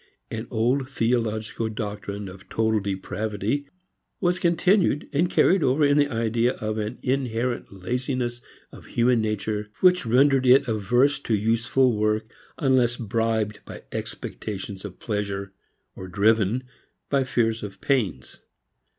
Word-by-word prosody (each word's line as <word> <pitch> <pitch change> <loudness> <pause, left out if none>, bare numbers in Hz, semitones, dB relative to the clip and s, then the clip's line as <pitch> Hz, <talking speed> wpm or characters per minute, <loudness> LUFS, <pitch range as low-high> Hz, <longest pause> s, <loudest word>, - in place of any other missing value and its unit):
An - - -4
old 130 +4 0
theological 115 -3 -1
doctrine 105 -2 -5
of 95 0 -12
total 110 -1 +1
depravity 105 +6 -3 0.5
was 180 -1 +1
continued 175 -2 +2
and 170 +5 +2
carried 190 +1 +4
over 145 +2 +3
in 145 0 +4
the 145 0 +3
idea 115 +1 +1
of 110 -1 -3
an 110 +3 -3
inherent 125 -2 -1
laziness 120 +4 -3 0.3
of - - -13
human 120 0 +2
nature 105 -1 -2
which 180 -1 +5
rendered 130 +2 +4
it 135 +2 +6
averse 120 +6 +2
to 115 -5 0
useful 115 +4 +2
work, 105 +1 +1 0.3
unless 130 -4 +2
bribed 110 -1 -1
by - - -10
expectations 100 -2 -6
of 100 -3 -8
pleasure, 100 -3 -3 0.4
or 95 - -8
driven 110 +5 +2 0.5
by 140 -2 +3
fears 115 -3 0
of 100 -2 -8
pains. 100 - -1
115 Hz, 130 wpm, -25 LUFS, 105-130 Hz, 0.5 s, it